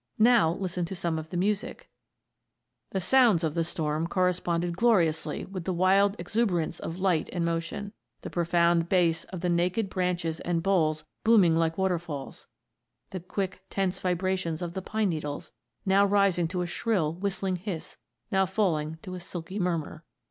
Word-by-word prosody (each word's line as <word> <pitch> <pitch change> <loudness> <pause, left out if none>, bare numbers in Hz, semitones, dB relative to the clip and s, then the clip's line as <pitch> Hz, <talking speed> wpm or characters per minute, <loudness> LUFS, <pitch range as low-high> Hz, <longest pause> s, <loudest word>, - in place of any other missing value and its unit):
Now 220 -7 +5
listen 180 -1 -3
to 190 - -6
some 170 -2 -1
of 160 0 -8
the 175 - -4
music: 210 - -1 1.0
"The 190 - -2
sounds 220 -3 +4
of 155 -2 0
the 165 0 +1
storm 160 0 -2
corresponded 175 -1 0
gloriously 175 -8 +2
with 185 -3 -7
the 185 - 0
wild 195 +3 +4
exuberance 180 -3 -1
of 165 - -5
light 185 -4 +1
and 175 -2 -1
motion. 170 +5 -3 0.3
The - - -6
profound 170 0 +2
bass 170 -3 +2
of 185 -3 -7
the 180 - 0
naked 180 +4 +1
branches 175 -3 -1
and 170 -1 -1
boles 155 -6 +1 0.2
booming 205 -8 +5
like 165 0 +1
waterfalls, 170 -7 -3 0.6
the 185 - -4
quick, 185 +1 -4
tense 195 -1 -1
vibrations 180 -2 -1
of 170 -1 -4
the 190 - -4
pine 215 +1 0
needles, 150 -3 -4 0.3
now 195 +1 +5
rising 195 -4 +3
to 180 +1 -2
a - - -2
shrill, 175 -4 0
whistling 190 0 -2
hiss, 180 -3 -6 0.3
now 190 -1 +3
falling 160 -6 0
to 185 - -7
a 180 - -5
silky 175 +3 -6
murmur. 170 -3 -2
180 Hz, 165 wpm, -28 LUFS, 165-195 Hz, 1.0 s, Now